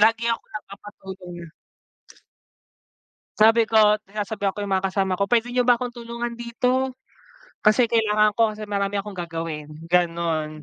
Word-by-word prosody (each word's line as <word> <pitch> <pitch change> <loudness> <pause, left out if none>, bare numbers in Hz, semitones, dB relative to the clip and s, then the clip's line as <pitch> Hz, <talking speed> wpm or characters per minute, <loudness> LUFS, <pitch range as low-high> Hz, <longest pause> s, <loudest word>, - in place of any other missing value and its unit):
lagi 225 +2 +4
ako - - -4
nagpapatulong. 190 -4 -9 1.9
Sabi 225 +1 +5
ko, 215 -2 +5
sinasabihan 205 -1 -3
ko 205 - -4
yung 200 - -5
mga 195 - -1
kasama 190 -1 -1
ko, 200 - +1
"Pwede 240 +2 +1
niyo 250 0 +1
ba 245 - +7
akong 245 0 -4
tulungan 235 0 -6
dito, 250 +2 0 0.7
kasi 230 +2 +5
kailangan 215 -2 +3
ko 220 -2 +3
kasi 215 - -9
marami 200 -1 -2
akong 200 -3 -9
gagawin." 165 -3 -4 0.2
Gano'n 165 -3 0
210 Hz, 140 wpm, -23 LUFS, 190-235 Hz, 1.9 s, ba